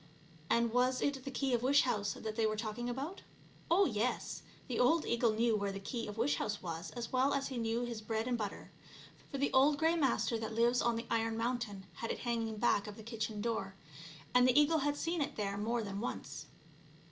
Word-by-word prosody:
And 235 Hz, -1 st, +2 dB
was 255 Hz, +1 st, +3 dB
it 275 Hz, -2 st, -1 dB
the -, -, -3 dB
key 265 Hz, 0 st, -1 dB
of 235 Hz, -, +2 dB
wish 280 Hz, +3 st, +5 dB
house 205 Hz, -5 st, 0 dB
that 220 Hz, -1 st, -5 dB
they 225 Hz, -1 st, +2 dB
were 215 Hz, -, -1 dB
talking 220 Hz, +2 st, -3 dB
about? 280 Hz, +10 st, -4 dB, 0.5 s
Oh, 385 Hz, +4 st, +5 dB
yes; 230 Hz, -, -1 dB, 0.3 s
the 245 Hz, -4 st, -2 dB
old 310 Hz, +6 st, +4 dB
eagle 235 Hz, -1 st, +2 dB
knew 225 Hz, +1 st, +2 dB
where 200 Hz, -1 st, -1 dB
the 195 Hz, -, -5 dB
key 230 Hz, +4 st, -4 dB
of 210 Hz, +1 st, -7 dB
wish 245 Hz, +6 st, +2 dB
house 210 Hz, -1 st, -2 dB
was 165 Hz, 0 st, -5 dB
as 235 Hz, 0 st, -5 dB
well 260 Hz, +2 st, +3 dB
as 275 Hz, 0 st, -1 dB
he 260 Hz, -, -4 dB
knew 230 Hz, +1 st, 0 dB
his 235 Hz, -2 st, -4 dB
bread 220 Hz, +1 st, -2 dB
and 250 Hz, -, +1 dB
butter, 210 Hz, -4 st, -5 dB, 0.6 s
for 280 Hz, -, -4 dB
the 280 Hz, +1 st, 0 dB
old 285 Hz, +3 st, +5 dB
Grey 325 Hz, +3 st, +3 dB
Master 265 Hz, -6 st, +1 dB
that 220 Hz, 0 st, -4 dB
lives 240 Hz, +2 st, +3 dB
on 235 Hz, -1 st, +2 dB
the 230 Hz, -, -4 dB
iron 225 Hz, 0 st, +1 dB
mountain 230 Hz, -5 st, -2 dB
had 230 Hz, -, -4 dB
it -, -, -3 dB
hanging 225 Hz, -2 st, -1 dB
back 210 Hz, -2 st, +2 dB
of 210 Hz, -, -8 dB
the 220 Hz, -, -10 dB
kitchen 220 Hz, -2 st, -3 dB
door, 200 Hz, -4 st, -2 dB, 0.6 s
and 250 Hz, 0 st, +6 dB
the 255 Hz, +3 st, +6 dB
eagle 315 Hz, +2 st, +4 dB
had 290 Hz, +1 st, 0 dB
seen 335 Hz, +1 st, -1 dB
it 290 Hz, +1 st, -2 dB
there 200 Hz, -2 st, -2 dB
more 225 Hz, +3 st, -1 dB
than 200 Hz, -1 st, -4 dB
once. 245 Hz, -, -5 dB
235 Hz, 225 wpm, -34 LUFS, 220-260 Hz, 0.6 s, and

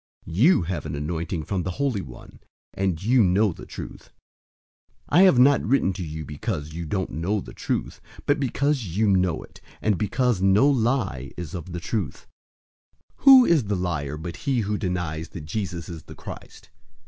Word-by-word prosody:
002:020 -, -, -7 dB
You 135 Hz, -, +5 dB
have 85 Hz, -3 st, -4 dB
an 75 Hz, -, -4 dB
anointing 80 Hz, +2 st, -3 dB
from 95 Hz, +3 st, -2 dB
the 90 Hz, -, -3 dB
Holy 135 Hz, -8 st, 0 dB
One, 65 Hz, -8 st, -12 dB, 0.3 s
and 95 Hz, -3 st, -1 dB
you 120 Hz, +2 st, +4 dB
know 95 Hz, +1 st, +3 dB
the -, -, -12 dB
truth. -, -, -9 dB, 1.0 s
002:021 165 Hz, -, +5 dB
I -, -, +8 dB
have 185 Hz, -9 st, +6 dB
not 140 Hz, +3 st, +5 dB
written 110 Hz, -5 st, +2 dB
to 90 Hz, -, -5 dB
you 80 Hz, -1 st, -6 dB
because 75 Hz, +1 st, -4 dB
you 85 Hz, 0 st, -5 dB
don't 95 Hz, +2 st, -2 dB
know 95 Hz, +7 st, -1 dB
the -, -, -9 dB
truth, -, -, -3 dB, 0.2 s
but 145 Hz, -, +2 dB
because 140 Hz, +1 st, 0 dB
you 110 Hz, 0 st, +3 dB
know 90 Hz, -4 st, +2 dB
it, -, -, -16 dB, 0.2 s
and 105 Hz, -4 st, +1 dB
because 115 Hz, 0 st, +1 dB
no 95 Hz, +7 st, +5 dB
lie 120 Hz, -, 0 dB
is 85 Hz, -5 st, -6 dB
of 90 Hz, 0 st, -6 dB
the 85 Hz, -, -4 dB
truth. 90 Hz, -, -4 dB, 0.9 s
002:022 -, -, -26 dB
Who 265 Hz, -2 st, +10 dB
is 165 Hz, -, +3 dB
the 100 Hz, 0 st, -1 dB
liar 80 Hz, -6 st, -2 dB
but 85 Hz, +1 st, -6 dB
he 130 Hz, -4 st, 0 dB
who 105 Hz, 0 st, -2 dB
denies 85 Hz, -4 st, -3 dB
that 80 Hz, -4 st, -8 dB
Jesus 85 Hz, -1 st, -4 dB
is 85 Hz, -3 st, -7 dB
the -, -, -13 dB
Christ? -, -, -11 dB
95 Hz, 190 wpm, -24 LUFS, 80-115 Hz, 1.0 s, Who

